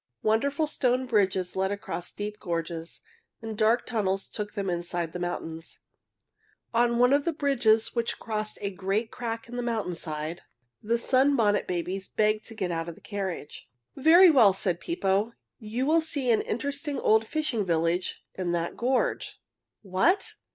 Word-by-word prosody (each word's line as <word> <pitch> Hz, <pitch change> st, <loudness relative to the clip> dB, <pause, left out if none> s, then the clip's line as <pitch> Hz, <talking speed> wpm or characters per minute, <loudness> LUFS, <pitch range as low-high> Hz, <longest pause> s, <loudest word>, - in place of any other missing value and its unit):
Wonderful 280 Hz, +8 st, +2 dB
stone 255 Hz, -3 st, 0 dB
bridges 190 Hz, -6 st, +1 dB
led 190 Hz, +1 st, 0 dB
across 200 Hz, -3 st, -5 dB
deep 210 Hz, +1 st, -5 dB
gorges, 165 Hz, -2 st, -4 dB, 0.4 s
and 225 Hz, -1 st, -6 dB
dark 225 Hz, +3 st, +3 dB
tunnels 195 Hz, -5 st, -1 dB
took 210 Hz, -1 st, -5 dB
them 200 Hz, -2 st, -2 dB
inside 175 Hz, -1 st, -2 dB
the 180 Hz, -, -4 dB
mountains. 165 Hz, -2 st, -5 dB, 0.9 s
On 235 Hz, 0 st, +3 dB
one 250 Hz, +2 st, +5 dB
of 285 Hz, 0 st, +3 dB
the 335 Hz, -, +1 dB
bridges 245 Hz, -7 st, +2 dB
which 235 Hz, -1 st, -1 dB
crossed 215 Hz, -1 st, -4 dB
a 200 Hz, -1 st, -2 dB
great 195 Hz, +4 st, -1 dB
crack 230 Hz, -2 st, -4 dB
in 245 Hz, +1 st, -7 dB
the -, -, -1 dB
mountain 225 Hz, -6 st, -2 dB
side 155 Hz, 0 st, -5 dB, 0.4 s
the 230 Hz, +2 st, +1 dB
Sunbonnet 255 Hz, -4 st, +3 dB
Babies 185 Hz, +2 st, -3 dB
begged 215 Hz, 0 st, +1 dB
to 225 Hz, -, -9 dB
get 190 Hz, -5 st, -2 dB
out 165 Hz, 0 st, -2 dB
of 170 Hz, -, -8 dB
the -, -, -17 dB
carriage. 190 Hz, -7 st, -5 dB, 0.3 s
"Very 335 Hz, +6 st, +7 dB
well," 230 Hz, -9 st, +6 dB
said 185 Hz, -2 st, -1 dB
Pippo. 205 Hz, -, 0 dB, 0.3 s
"You 230 Hz, +4 st, -2 dB
will 320 Hz, +3 st, +4 dB
see 285 Hz, -6 st, 0 dB
an 220 Hz, -, +3 dB
interesting 285 Hz, +5 st, -3 dB
old 220 Hz, 0 st, +3 dB
fishing 300 Hz, -8 st, -1 dB
village 170 Hz, 0 st, 0 dB
in 180 Hz, -2 st, -2 dB
that 170 Hz, 0 st, -1 dB
gorge." 255 Hz, +2 st, 0 dB, 0.4 s
"What! 205 Hz, -, +1 dB
215 Hz, 160 wpm, -27 LUFS, 185-245 Hz, 0.9 s, Very